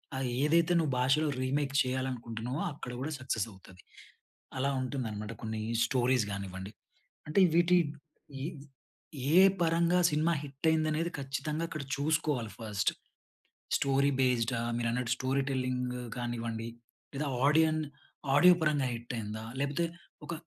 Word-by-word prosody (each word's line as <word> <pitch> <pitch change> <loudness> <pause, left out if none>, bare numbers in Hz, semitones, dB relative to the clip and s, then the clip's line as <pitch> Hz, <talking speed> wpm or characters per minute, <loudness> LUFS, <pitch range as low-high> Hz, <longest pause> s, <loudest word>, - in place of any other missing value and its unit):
అహ్, 130 0 -1 0.2
ఏదైతే 170 +3 +3
నువ్వు 160 -4 +1
భాషలో 135 +5 +3
రీమేక్ 140 +2 0
చెయ్యాలనుకుంటున్నావో 125 - -3
అక్కడ 130 -4 -7
కూడా 155 +4 -3
సక్సెస్ 125 -5 -1
అవుతది. 95 -1 -16 0.8
అలా 135 +2 +1
ఉంటుందనమాట 115 -5 -3
కొన్ని 110 -1 -3 0.2
స్టోరీస్ 125 -1 +2
గానివ్వండి. 95 0 -5 0.6
అంటే 155 +6 +3
వీటి 175 +1 +5 0.7
ఇ - - -2 0.9
ఏ 180 - +8 0.2
పరంగా 170 +2 +3
సినిమా 160 +3 +2
హిట్ 140 +3 -4
అయిందనేది 160 +2 +1
ఖచ్చితంగా 150 +4 -2
అక్కడ 155 -3 -5
చూసుకోవాలి 145 -6 0
ఫస్ట్. 105 -3 0 0.9
స్టోరీ 140 +1 +2
బేస్డా, 125 -2 +2 0.2
మీరన్నట్టు 120 +1 0
స్టోరీ 135 +1 0
టెల్లింగ్ 125 -1 -1 0.2
కానివ్వండి 115 -2 -3 0.5
లేదా 145 +1 -2 0.2
ఆడియన్ 155 +1 +4 0.6
ఆడియో 180 +4 +8
పరంగా 145 -4 +2
హిట్ 120 +1 -6
అయిందా? 110 +1 -5 0.2
లేకపోతే 145 +4 0 0.4
ఒక 170 - -5
130 Hz, 120 wpm, -31 LUFS, 120-155 Hz, 0.9 s, ఏ